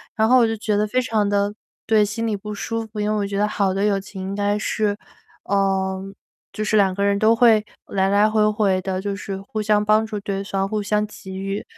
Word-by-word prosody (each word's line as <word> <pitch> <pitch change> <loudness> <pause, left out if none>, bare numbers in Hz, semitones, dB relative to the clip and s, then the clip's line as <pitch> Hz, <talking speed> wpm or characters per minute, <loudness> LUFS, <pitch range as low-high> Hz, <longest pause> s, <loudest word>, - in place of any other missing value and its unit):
然 220 -1 +2
后 255 +2 +6
我 230 - +4
就 225 - -1
觉 210 0 -1
得 210 +1 +1
非 255 +4 +1
常 220 -4 0
地 205 0 +1 0.3
对， 220 -1 +4
心 215 +3 -2
里 220 -2 0
不 210 +1 -7
舒 225 +2 -3
服， 215 -1 -8
因 210 - 0
为 - - +1
我 205 - 0
觉 200 0 -3
得 210 +1 +2
好 200 -2 0
的 195 +1 -1
友 200 -2 +2
情 195 -1 -9
应 190 +1 -4
该 205 0 0
是 210 -1 -1 0.5
嗯， 195 0 0 0.4
就 215 - -3
是 215 0 +2
2 195 -2 +3
个 200 - -1
人 200 0 +2
都 220 +2 +4
会 225 -3 +5 0.2
来 190 -1 +1
来 205 +2 +4
回 215 -1 +3
回 200 -3 +1
地， 185 0 -3
就 200 0 -3
是 195 0 -5
互 215 +2 -5
相 210 0 +2
帮 215 +1 +3
助 215 -1 -5
对 200 -1 -3
方、 195 -1 -2
互 215 0 -2
相 210 +1 0
给 190 -2 -10
予。 195 +2 -3
205 Hz, 260 characters per minute, -22 LUFS, 195-215 Hz, 0.5 s, 后